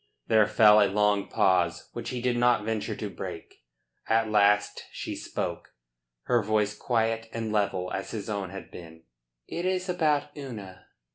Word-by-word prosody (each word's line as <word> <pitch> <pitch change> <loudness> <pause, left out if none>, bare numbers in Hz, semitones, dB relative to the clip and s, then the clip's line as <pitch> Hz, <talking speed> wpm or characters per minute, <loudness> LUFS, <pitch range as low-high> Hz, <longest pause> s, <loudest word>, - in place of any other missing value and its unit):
There 110 -2 +4
fell 105 -1 +6
a 100 - +4
long 105 0 +2
pause, 90 -3 +1
which - - -5
he 125 -1 -4
did 125 -1 +1
not 120 -2 +3
venture 110 -2 -2
to - - -4
break. - - -8 0.4
At 110 -1 +2
last 105 0 +3
she - - -5
spoke, - - -5 0.5
her 120 -1 +2
voice 105 0 0
quiet 115 -1 -1
and 115 -1 -3
level 95 -4 0
as 95 - -4
his 105 -3 -5
own 100 -4 -3
had 95 +1 -9
been. 80 -1 -12 0.4
"It 170 - -4
is 185 0 -1
about 150 -4 0
Una." 105 -10 -9
105 Hz, 160 wpm, -27 LUFS, 100-120 Hz, 0.5 s, fell